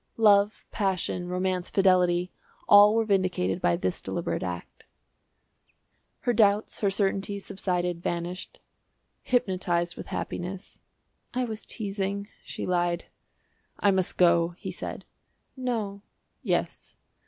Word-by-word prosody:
Love, 205 -1 +4
passion, 185 -3 -1
romance, 180 0 -1
fidelity 180 -2 +3 0.4
all 205 +1 +8
were 225 -1 +2
vindicated 185 - +1
by 85 - +3
this 90 +1 -2
deliberate - - -3
act. 90 -1 -6 1.4
Her 245 - +1
doubts, 210 -1 +3
her 200 - +2
certainties, 195 0 0
subsided, 180 -2 -2
vanished 175 +1 -4 0.6
hypnotised 180 -7 0
with - - -8
happiness. 185 +3 -5 0.6
"I 255 - +1
was 220 -3 -5
teasing," 200 -1 -3
she - - -6
lied. 175 -1 0 0.7
"I 200 - +4
must 190 -2 0
go," 170 -1 +4
he - - -6
said. - - -6 0.5
"No." 225 -6 -3 0.4
"Yes." - - -2
190 Hz, 110 wpm, -27 LUFS, 175-205 Hz, 1.4 s, all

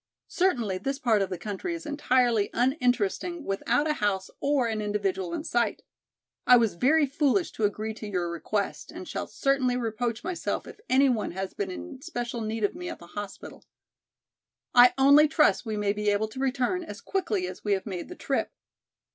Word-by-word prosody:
Certainly 240 - +1
this 270 +7 -2
part 230 -7 +2
of 195 - 0
the 185 - -4
country 210 - -4
is 335 - -8
entirely 250 -7 +2
uninteresting 255 - 0
without 235 +9 0
a 305 - +2
house 195 -2 0
or 280 -3 +2
an 220 -1 -2
individual 195 -3 -1
in 300 - -3
sight. 240 -8 0 0.6
I 250 - +9
was 225 -3 +2
very 290 - +3
foolish 285 +5 +1
to 220 - -1
agree 215 +2 -2
to 215 0 -8
your 180 -4 -2
request 200 +5 -3
and - - -8
shall - - -4
certainly 265 -3 +1
reproach 230 0 -2
myself 360 +1 -3
if - - -11
any 275 +2 +5
one 230 -8 0
has 190 +1 -4
been 200 -2 -3
in 270 - -8
special 240 -7 -4
need 220 0 -3
of 205 - +2
me 355 +1 -6
at - - -6
the 170 - -13
hospital. 205 -1 -8 1.1
I 245 0 +7
only 285 +3 +7
trust 300 -5 +3
we 215 -1 -2
may 205 -1 +1
be 210 0 0
able 205 +1 +1
to 230 - -9
return 270 +7 0
as - - -8
quickly 385 0 -1
as - - -8
we 205 - +1
have 190 - -1
made 185 -5 -5
the 360 - -8
trip." - - -1
240 Hz, 190 wpm, -27 LUFS, 205-280 Hz, 1.1 s, I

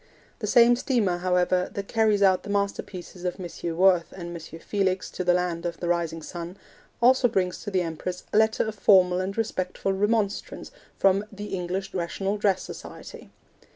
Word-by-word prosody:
The 210 - -3
same 240 +3 +6
steamer, 230 -9 0
however, 180 0 +1
that 200 0 -4
carries 215 -3 +2
out 190 -2 +4
the - - -10
masterpieces 200 -3 -3
of 180 0 -3
M. 170 -2 -5
Worth 180 -2 +4
and 175 -2 -7
M. 165 0 -9
Felix 190 0 -1
to 185 - -4
the 180 0 +3
Land 175 -2 -1
of 170 -1 -4
the 175 - -3
Rising 170 -2 -1
Sun, 175 +3 -7 0.5
also 255 +1 +6
brings 185 -5 -1
to 205 - -5
the 185 -3 +1
Empress 175 +2 -5
a - - +3
letter 220 0 +2
of 220 - -3
formal 185 -3 +4
and 195 +2 -4
respectful 195 -3 -1
remonstrance 205 +1 -1 0.3
from 195 +1 +3
the 205 0 -7
English 185 +1 -3
Rational 195 +3 -2
Dress 200 -2 +1
Society. - - -10
185 Hz, 175 wpm, -26 LUFS, 175-205 Hz, 0.5 s, same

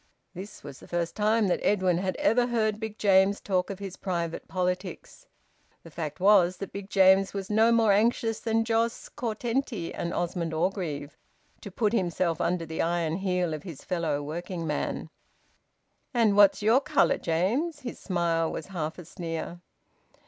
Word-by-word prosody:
This 195 +3 -9
was 140 -2 -9
the - - -14
first 170 -1 -2
time 215 0 +2
that 180 - +1
Edwin 185 -4 +2
had 185 0 -2
ever 240 +3 +2
heard 215 -3 0
Big 220 -1 -5
James 195 0 +4
talk 185 -2 -1
of 195 - -5
his 195 -2 -7
private 170 -3 -3
politics. 180 - -4 0.6
The 165 - -13
fact 155 0 -5
was 185 -2 +5
that 195 - -6
Big 200 0 -7
James 195 0 +4
was 195 0 -4
no 220 +2 +4
more 225 -2 +4
anxious 225 +1 +2
than 225 0 0
Jos 230 0 0
Curtenty 235 -3 -3
and 170 - -3
Osmond 170 -2 -2
Orgreave 155 -5 -2 0.5
to - - -7
put 210 +3 0
himself 175 -4 0
under 175 -1 0
the 160 0 -3
iron 170 -1 0
heel 180 -3 0
of 155 - -5
his 165 -7 -9
fellow 160 -5 -1
working 170 +3 -5
man. 150 -2 -3 1.0
"And 220 -4 +4
what's 205 0 +5
your 230 +6 +5
colour, - - +2
James?" 240 - 0
His 245 -3 -7
smile 170 -3 0
was 160 - -5
half 160 -2 -3
a 175 - -9
sneer. 170 +1 -6
185 Hz, 165 wpm, -27 LUFS, 170-215 Hz, 1.0 s, was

